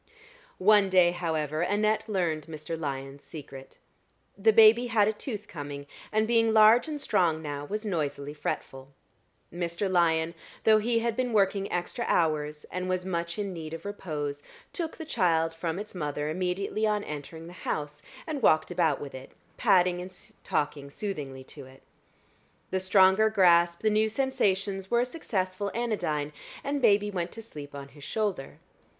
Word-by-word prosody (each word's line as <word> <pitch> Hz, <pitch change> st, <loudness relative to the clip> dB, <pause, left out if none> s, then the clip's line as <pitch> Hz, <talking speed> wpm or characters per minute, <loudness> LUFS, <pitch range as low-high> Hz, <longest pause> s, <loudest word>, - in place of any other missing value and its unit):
One 205 Hz, 0 st, +5 dB
day, 180 Hz, -2 st, +5 dB
however, 160 Hz, -3 st, -2 dB
Annette 210 Hz, +4 st, +1 dB
learned 170 Hz, -6 st, -1 dB
Mr. 155 Hz, 0 st, -5 dB
Lyon's 140 Hz, -2 st, -5 dB
secret. 135 Hz, -4 st, -10 dB, 0.6 s
The 215 Hz, +3 st, +4 dB
baby 225 Hz, +3 st, +7 dB
had 220 Hz, -3 st, +3 dB
a 215 Hz, -, +1 dB
tooth 210 Hz, -2 st, -6 dB
coming, 145 Hz, -2 st, -7 dB, 0.3 s
and 215 Hz, 0 st, +2 dB
being 230 Hz, -1 st, +3 dB
large 220 Hz, +5 st, +7 dB
and 300 Hz, -2 st, -4 dB
strong 170 Hz, -, +1 dB
now, 145 Hz, -2 st, -5 dB
was 210 Hz, +7 st, -4 dB
noisily 145 Hz, -6 st, -2 dB
fretful. 135 Hz, -2 st, -5 dB, 0.6 s
Mr. 170 Hz, +3 st, -2 dB
Lyon, 170 Hz, -3 st, +2 dB, 0.3 s
though 220 Hz, -1 st, +6 dB
he 230 Hz, +1 st, +1 dB
had 230 Hz, -1 st, -1 dB
been 250 Hz, -1 st, -1 dB
working 195 Hz, -1 st, +2 dB
extra 180 Hz, +7 st, -2 dB
hours 150 Hz, -2 st, 0 dB
and 185 Hz, 0 st, -3 dB
was 185 Hz, 0 st, -1 dB
much 170 Hz, -2 st, -3 dB
in 200 Hz, -2 st, -3 dB
need 160 Hz, -2 st, -6 dB
of 165 Hz, -, -11 dB
repose, 150 Hz, -8 st, -4 dB, 0.3 s
took 330 Hz, -3 st, -4 dB
the 320 Hz, -, -6 dB
child 165 Hz, -, +1 dB
from 165 Hz, 0 st, -3 dB
its 210 Hz, +2 st, -6 dB
mother 150 Hz, -3 st, -3 dB
immediately 185 Hz, +5 st, -1 dB
on 210 Hz, -1 st, 0 dB
entering 150 Hz, +1 st, -7 dB
the 175 Hz, -, -10 dB
house 150 Hz, -4 st, -4 dB, 0.2 s
and 305 Hz, -4 st, -4 dB
walked 155 Hz, -5 st, +3 dB
about 165 Hz, -5 st, +1 dB
with 140 Hz, -, -7 dB
it, 130 Hz, 0 st, -10 dB, 0.2 s
patting 180 Hz, -1 st, +3 dB
and 185 Hz, 0 st, -9 dB, 0.3 s
talking 145 Hz, -1 st, -2 dB
soothingly 140 Hz, -7 st, -5 dB
to 135 Hz, 0 st, -12 dB
it. 130 Hz, +1 st, -17 dB, 0.9 s
The 190 Hz, -, +1 dB
stronger 190 Hz, +3 st, +5 dB
grasp, 170 Hz, -4 st, +4 dB
the 215 Hz, -, +2 dB
new 215 Hz, +1 st, +2 dB
sensations, 200 Hz, -6 st, 0 dB
were 235 Hz, 0 st, +3 dB
a -, -, +1 dB
successful 200 Hz, -, -3 dB
anodyne, 175 Hz, -11 st, -1 dB, 0.3 s
and 280 Hz, 0 st, -2 dB
baby 205 Hz, -3 st, +4 dB
went 175 Hz, -2 st, -3 dB
to 225 Hz, -, -8 dB
sleep 145 Hz, -9 st, -9 dB
on 140 Hz, 0 st, -8 dB
his 145 Hz, +1 st, -15 dB
shoulder. 205 Hz, -10 st, -3 dB
180 Hz, 165 wpm, -28 LUFS, 155-215 Hz, 0.9 s, baby